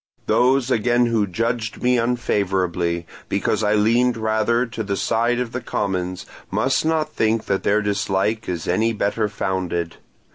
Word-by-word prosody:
Those 130 +1 +2
again 120 +1 +3
who 115 -3 +1
judged 115 +3 -2
me 125 0 +3
unfavourably, 95 -8 0 0.2
because 100 +1 0
I 105 0 +3
leaned 115 +3 +3
rather 110 +2 +1
to 115 -1 -6
the 100 -2 -2
side 120 +2 +1
of 125 -2 -2
the 125 - -4
commons, 90 -4 -2 0.2
must 110 +7 +1
not 155 -1 0
think 110 0 +1
that 100 -1 0
their 105 +1 +2
dislike 100 +1 -1
is 85 -3 -3
any 110 +6 +1
better 105 +1 0
founded. 90 -4 -2
110 Hz, 150 wpm, -21 LUFS, 100-120 Hz, 0.2 s, again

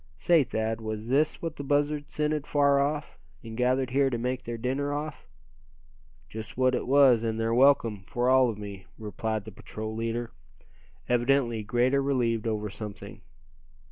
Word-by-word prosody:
"Say, 165 - +4
Thad, 110 -1 -2
was 110 0 -5
this 150 +6 +1
what 165 -2 -4
the 140 - -5
buzzards 145 +1 0
scented 150 -1 -1
far 140 -1 +3
off, 145 - -2 0.2
and 115 -1 -8
gathered 125 +1 +1
here 135 +1 +3
to 120 - -2
make 125 +2 -2
their 120 0 -5
dinner 135 +5 -2
off?" 150 - -5 1.0
"Just 110 - -8
what 130 0 +3
it - - -2
was, 130 -4 +5
and 110 -1 -2
they're 115 0 0
welcome, 120 -5 +4
for 120 +1 -1
all 130 -1 +5
of 110 - -4
me," 100 -2 -8
replied 110 0 -4
the 110 - -8
patrol 110 +2 -7
leader; 115 +1 -3 0.8
evidently 120 -1 +2
greatly 125 +5 +1
relieved 120 -5 0
over 105 -1 -1
something. 105 0 -9
125 Hz, 165 wpm, -27 LUFS, 110-140 Hz, 1.0 s, was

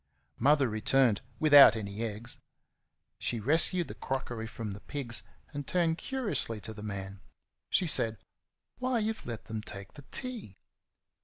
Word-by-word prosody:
Mother 140 +1 +4
returned 110 +1 +2 0.2
without 145 -7 +9
any 100 -1 -5
eggs. 115 +1 -5 0.8
She 120 - -2
rescued 160 - +2
the - - -7
crockery 120 -4 -4
from 110 -1 -6
the 100 - -7
pigs 120 -2 -4 0.3
and 145 -1 -5
turned 170 -2 +1
curiously 225 - -2
to 110 - -7
the 105 - -10
man. 100 -2 -6 0.5
She 185 - +2
said, 115 -8 +2 0.6
"Why, 255 -1 0
you've 220 0 -2
let 115 -3 -6
them 110 -1 -4
take 100 -2 -9
the 145 -2 -13
tea!" 245 - -3
120 Hz, 145 wpm, -30 LUFS, 110-155 Hz, 0.8 s, without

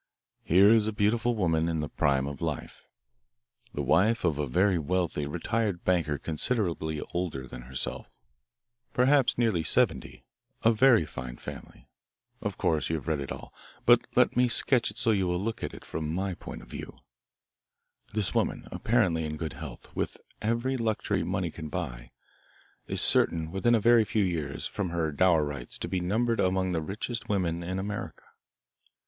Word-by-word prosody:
"Here 95 +5 +6
is 110 -2 +5
a - - 0
beautiful 110 +3 +1
woman 85 -5 +1
in 80 -1 -1
the 75 - -2
prime 70 -2 +1
of 70 -1 -6
life, - - -5 0.8
the - - -3
wife 105 +4 +3
of 75 -4 +1
a 75 - 0
very 90 +6 +2
wealthy 80 -2 -1
retired 95 +4 -1
banker 85 -5 +1
considerably 80 - -1
older 85 -7 -2
than 60 -1 -9
herself 65 +1 -5 0.8
perhaps 135 +1 +3
nearly 110 -8 +2
seventy - - 0 0.4
of 115 -1 +3
very 120 -9 +6
fine 65 -3 -7
family. - - -10 0.5
Of - - -3
course 80 -4 +1
you 80 - 0
have 80 - -6
read 80 -3 0
it 70 - -5
all, - - -8 0.3
but - - +5
let - - +4
me 125 0 +4
sketch 120 +1 +2
it 105 - -11
so 120 -2 +2
you 95 -4 +1
will 90 0 0
look 110 +5 -3
at - - -4
it - - -12
from 80 -1 -4
my 95 +1 -1
point - - -9
of - - -15
view. - - -8 1.1
This 105 -3 0
woman, - - 0
apparently 95 -9 +1
in 75 0 -4
good 80 0 -4
health, 70 -3 -10
with - - -2 0.2
every 120 +4 0
luxury 110 -3 0
money - - -2
can 80 -2 -7
buy, - - -5 0.8
is - - 0
certain 80 -1 +2
within 120 +6 +3
a - - +3
very 115 +1 +5
few 105 0 +1
years, 80 -6 -2
from 100 -4 -3
her 85 -2 -1
dower 80 0 +3
rights, 70 -5 -6
to - - -4
be 95 - -1
numbered 110 +6 0
among 95 0 +1
the 80 -2 0
richest 110 +7 -5
women 90 -4 0
in 90 +2 -3
America. 105 +2 -5
90 Hz, 175 wpm, -28 LUFS, 80-110 Hz, 1.1 s, Here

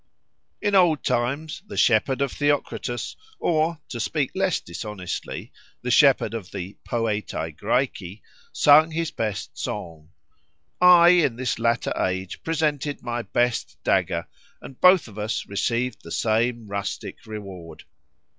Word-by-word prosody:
In 205 - +1
old 175 -7 +4
times 140 +6 -1
the 210 - -8
shepherd 130 +4 +3
of 135 - -2
Theocritus, 145 -4 -1 0.2
or 160 - +1
(to 120 - -5
speak 140 +4 -1
less 190 -2 +1
dishonestly) 95 +1 -6 0.3
the - - -1
shepherd - - +5
of 110 -6 -5
the 100 +1 -6
"Poetæ 110 -3 -2
Græci," 110 -7 -2 0.3
sung 150 +2 +6
his 165 0 -2
best 105 -3 -4
song; 80 -2 -6 0.7
I 175 -1 +8
in 170 -9 +4
this 125 -1 -2
latter 115 0 +1
age 95 0 -2
presented 150 -4 -1
my 120 0 -2
best 120 0 -1
dagger, - - +1 0.3
and 130 - -12
both 180 -5 +6
of 105 -1 -10
us 110 +2 -2
received 115 +4 -1
the - - -11
same 115 +1 0
rustic 100 +1 -5
reward. 95 -6 -9
120 Hz, 130 wpm, -24 LUFS, 105-155 Hz, 0.7 s, I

